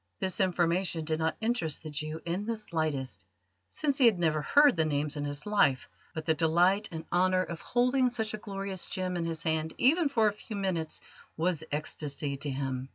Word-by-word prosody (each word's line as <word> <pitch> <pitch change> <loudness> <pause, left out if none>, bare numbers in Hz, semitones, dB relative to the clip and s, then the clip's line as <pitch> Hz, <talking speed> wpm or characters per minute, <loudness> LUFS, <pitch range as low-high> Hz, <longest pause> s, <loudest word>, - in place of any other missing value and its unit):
This 190 -1 -1
information 175 -2 +1
did 155 0 0
not 160 0 0
interest 220 -11 -1
the 155 - -6
Jew 155 +2 -4
in 180 +5 -2
the 230 -1 -1
slightest, 155 - -2 0.5
since 285 - 0
he 255 - +7
had 220 -5 +4
never 160 -3 +1
heard 285 - +5
the 160 - +2
names 150 -1 -1
in 145 -1 -3
his 145 0 -5
life; 200 -11 +2 0.3
but 160 -1 -4
the 160 - +3
delight 175 +6 +3
and 160 -1 -6
honour 185 +1 +3
of 170 -2 -7
holding 250 +1 +2
such 220 -3 -2
a - - -2
glorious 195 -3 -4
gem 185 -1 -2
in 170 -1 -1
his 165 -1 -4
hand 160 -1 -1
even 305 +4 +4
for 225 -6 +3
a 210 - +1
few 215 +1 -8
minutes 185 -5 -2 0.4
was 165 -1 0
ecstasy 145 -1 -3
to 145 +1 -3
him. 135 -1 -3
170 Hz, 200 wpm, -30 LUFS, 155-205 Hz, 0.5 s, he